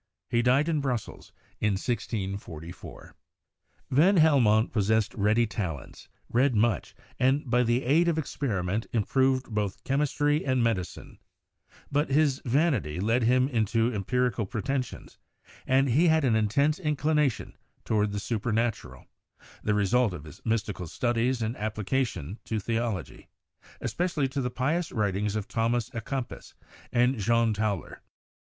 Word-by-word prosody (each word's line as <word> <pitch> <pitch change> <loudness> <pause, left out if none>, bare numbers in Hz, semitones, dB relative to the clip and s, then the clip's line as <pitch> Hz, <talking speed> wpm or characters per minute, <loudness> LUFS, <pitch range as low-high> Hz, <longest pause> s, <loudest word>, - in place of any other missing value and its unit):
He 120 - +3
died 130 +5 +3
in 155 -3 +1
Brussels 125 -5 -4 0.3
in 105 -1 +1
1644. 95 -6 -5 0.8
Van 170 +9 +5
Helmont 125 -9 +4
possessed 110 0 +1
ready 110 +3 +2
talents, 90 - -6 0.2
read 125 +1 +2
much, 110 +1 +1 0.2
and 135 +3 +2
by 125 +1 +3
the 120 +1 +1
aid 155 +7 +3
of 165 -2 +1
experiment, 110 - -2
improved 130 +2 +1
both 105 -2 -2
chemistry 145 +2 +1
and 130 -2 +1
medicine; 105 -7 -3 0.7
but 145 +1 +1
his 140 -1 +2
vanity 125 - +1
led 115 +6 +1
him 125 +3 +3
into 115 -1 +1
empirical 120 +2 0
preten 130 +6 -1
sions - - -13 0.5
and 135 +1 +3
he 155 +9 +4
had 160 -1 +3
an 115 -4 +3
intense 140 - +2
inclination 150 - 0 0.3
toward 105 -1 +1
the 100 - -3
super 115 +2 -2
natural 115 +1 -2 0.3
— - - -23
the 105 - +1
result 105 +2 +2
of 75 - -9
his 75 -2 -13
mystical 105 -6 -2
studies 120 +5 0
and 110 +2 -2
application 110 - -2
to 110 - -2
theology, 115 - -3 0.5
especially 170 -6 -1
to 135 +1 -3
the 125 - -1
pious 150 +7 -1
writings 105 -2 -1
of 105 -2 -3
Thomas 115 0 0
a 115 - -3
Kempis 130 +2 -6 0.4
and 125 0 +2
John 115 +2 +2
Tauler. 105 -3 -3
120 Hz, 140 wpm, -27 LUFS, 105-135 Hz, 0.8 s, Van